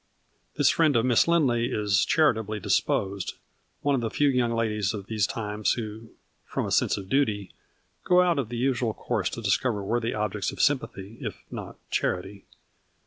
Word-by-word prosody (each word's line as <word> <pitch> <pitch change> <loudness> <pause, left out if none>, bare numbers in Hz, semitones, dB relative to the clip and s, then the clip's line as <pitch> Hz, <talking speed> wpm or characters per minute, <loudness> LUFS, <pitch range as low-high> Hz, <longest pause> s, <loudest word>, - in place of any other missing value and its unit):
This 145 0 +4
friend 155 -3 +3
of 115 +1 +3
Miss 125 +2 +4
Lindley 130 -9 +3
is 105 -2 +2
charitably 110 -9 +2
disposed, 100 0 0 0.5
one 145 - +1
of 130 - +1
the 115 - -1
few 145 +6 +2
young 125 -3 +1
ladies 110 -3 0
of 100 -2 -6
these 105 -2 0
times 105 -1 -1
who, 110 -1 -6 0.3
from - - -3
a - - -4
sense - - +2
of 95 -2 -7
duty, 105 -5 0 0.5
go 180 0 +5
out 175 -4 +2
of 120 -6 -2
the 120 - -4
usual 120 -3 0
course - - -1
to - - -7
discover 110 -6 +1
worthy 115 +3 -1
objects 105 -1 -1
of - - -11
sym 145 -2 +4
pathy, 100 -1 -10
if - - -6
not - - -7
of - - -40
charity. 95 +2 -2
115 Hz, 185 wpm, -26 LUFS, 105-130 Hz, 0.5 s, go